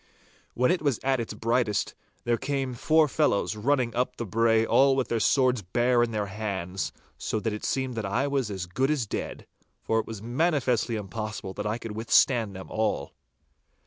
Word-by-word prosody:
When 125 Hz, +1 st, +3 dB
it 180 Hz, -, 0 dB
was 140 Hz, -6 st, +1 dB
at 135 Hz, -1 st, +2 dB
its 115 Hz, -2 st, -4 dB
brightest, 115 Hz, -2 st, 0 dB, 0.3 s
there 120 Hz, -1 st, +1 dB
came 135 Hz, -2 st, -2 dB
four 155 Hz, +5 st, +3 dB
fellows 130 Hz, -8 st, +1 dB
running 125 Hz, +2 st, +1 dB
up 125 Hz, +1 st, 0 dB
the 120 Hz, -, -4 dB
brae 115 Hz, +2 st, +3 dB
all 135 Hz, +3 st, +4 dB
with 130 Hz, -2 st, -1 dB
their 115 Hz, -, 0 dB
swords 130 Hz, 0 st, +3 dB
bare 120 Hz, +6 st, +2 dB
in 120 Hz, -, +2 dB
their 105 Hz, -2 st, -1 dB
hands, 95 Hz, -3 st, -3 dB, 0.3 s
so 110 Hz, -, -2 dB
that 110 Hz, 0 st, -2 dB
it 105 Hz, -, -6 dB
seemed 130 Hz, -1 st, -1 dB
that 110 Hz, -2 st, -3 dB
I 120 Hz, +8 st, 0 dB
was 140 Hz, -5 st, 0 dB
as 95 Hz, -3 st, -4 dB
good 130 Hz, +10 st, 0 dB
as 150 Hz, -6 st, +1 dB
dead, -, -, -5 dB, 0.4 s
for 110 Hz, -, +1 dB
it 110 Hz, -, -4 dB
was 110 Hz, -2 st, -6 dB
manifestly 125 Hz, -, +1 dB
impossible 105 Hz, -2 st, -5 dB
that 105 Hz, +1 st, -4 dB
I 110 Hz, +2 st, -1 dB
could 115 Hz, -2 st, -7 dB
withstand 115 Hz, -1 st, +3 dB
them 95 Hz, -, -7 dB
all. 110 Hz, -1 st, -1 dB
115 Hz, 190 wpm, -27 LUFS, 105-130 Hz, 0.4 s, all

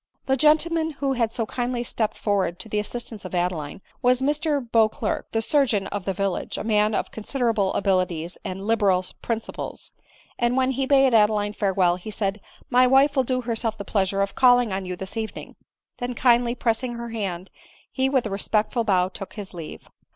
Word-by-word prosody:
The 265 Hz, -, +2 dB
gentleman 315 Hz, +3 st, +2 dB
who 275 Hz, -1 st, -1 dB
bad 230 Hz, -3 st, 0 dB
so 230 Hz, -1 st, -2 dB
kindly 245 Hz, +1 st, -2 dB
stepped 220 Hz, -2 st, -2 dB
forward 195 Hz, -4 st, 0 dB
to 185 Hz, -, -10 dB
the 210 Hz, -1 st, -1 dB
assistance 225 Hz, 0 st, -5 dB
of 185 Hz, -1 st, -6 dB
Adeline, 175 Hz, -1 st, -2 dB, 0.2 s
was 250 Hz, 0 st, +3 dB
Mr 295 Hz, +2 st, +1 dB
Beauclerc, 220 Hz, -2 st, +1 dB
die 225 Hz, -, 0 dB
sur 280 Hz, +4 st, +3 dB
geon 205 Hz, -4 st, 0 dB
of 205 Hz, -3 st, -4 dB
the 195 Hz, -, -1 dB
village, 195 Hz, -1 st, -2 dB
a -, -, -3 dB
man 210 Hz, -1 st, +2 dB
of -, -, -2 dB
considerable 220 Hz, -3 st, 0 dB
abilities 185 Hz, -4 st, 0 dB
and 190 Hz, +1 st, -5 dB
liberal 200 Hz, -5 st, +2 dB, 0.2 s
principles; 225 Hz, -1 st, -5 dB, 0.5 s
and 240 Hz, +1 st, +1 dB
when 260 Hz, 0 st, +2 dB
he 265 Hz, +1 st, -1 dB
bade 270 Hz, -2 st, +5 dB
Adeline 210 Hz, -1 st, +3 dB
farewell, 190 Hz, -4 st, +2 dB
he 185 Hz, +4 st, -9 dB
said, 200 Hz, -1 st, -2 dB
" -, -, -27 dB
My 255 Hz, 0 st, +7 dB
wife 275 Hz, +3 st, +4 dB
will 265 Hz, -, +4 dB
do 255 Hz, 0 st, -1 dB
herself 230 Hz, -2 st, -2 dB
the 200 Hz, -, -6 dB
pleasure 195 Hz, 0 st, +1 dB
of 200 Hz, -, -4 dB
calling 245 Hz, -4 st, +4 dB
on 190 Hz, -1 st, -3 dB
you 180 Hz, -, -3 dB
this 190 Hz, +4 st, -7 dB
evening 220 Hz, -1 st, -5 dB, 0.2 s
;" -, -, -62 dB
then, 245 Hz, -1 st, -3 dB
kindly 240 Hz, -1 st, +3 dB
pressing 240 Hz, +1 st, -1 dB
her 235 Hz, 0 st, -6 dB
hand, 195 Hz, -5 st, -4 dB, 0.4 s
he 265 Hz, 0 st, +1 dB
with 265 Hz, -3 st, +1 dB
a 215 Hz, -, -3 dB
respectful 215 Hz, +4 st, 0 dB
bow 185 Hz, -4 st, +2 dB
took 195 Hz, +1 st, -9 dB
his 205 Hz, -3 st, -8 dB
leave. 165 Hz, -3 st, -8 dB
220 Hz, 195 wpm, -24 LUFS, 195-250 Hz, 0.5 s, My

